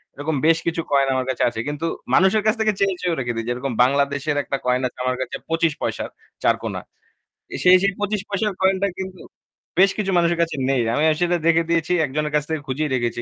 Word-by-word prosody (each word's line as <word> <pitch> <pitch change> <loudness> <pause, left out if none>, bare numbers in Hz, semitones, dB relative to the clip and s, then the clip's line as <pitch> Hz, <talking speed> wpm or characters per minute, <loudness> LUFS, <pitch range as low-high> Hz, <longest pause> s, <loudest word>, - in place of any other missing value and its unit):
এরকম 150 +2 -2
বেশ 165 0 +5
কিছু 165 0 0
কয়েন 140 -1 +3
আমার 130 -1 -1
কাছে 130 - 0
আছে। 110 - -7
কিন্তু 150 +2 -3 0.3
মানুষের 190 +3 +4
কাছ 215 - +4
থেকে 215 -1 +2
চেয়েও, 195 -1 +2
চেয়েও 175 -2 0
রেখে 120 -2 -2
দেই। 115 0 -3
যেরকম 125 +2 -2
বাংলাদেশের 140 +2 +1
একটা 140 - -2
কয়েন 125 0 +2
আছে 125 - -13
আমার 130 0 0
কাছে 130 - -4
২৫ 165 -1 +1
পয়সার - - -3 0.3
৪ - - +4
কোণা। - - -4 0.8
সেই 180 0 +8
সেই 200 0 +2
২৫ 205 0 -1
পয়সার 205 +1 -1
কয়েনটা 190 +1 +2
কিন্তু 190 -1 -6 0.6
বেশ 195 +1 +6
কিছু 200 -2 -1
মানুষের 170 0 +2
কাছে 165 -2 0
নেই। 135 -2 +2
আমি 145 - +1
আসলে 175 +3 +1
রেখে 165 0 +4
দিয়েছি। 170 0 +1
একজনের 150 +2 -3
কাছ 150 - +2
থেকে 160 -2 -2
খুঁজিয়ে 145 +4 -1
রেখেছি। 120 -1 -2
160 Hz, 210 wpm, -22 LUFS, 135-185 Hz, 0.8 s, সেই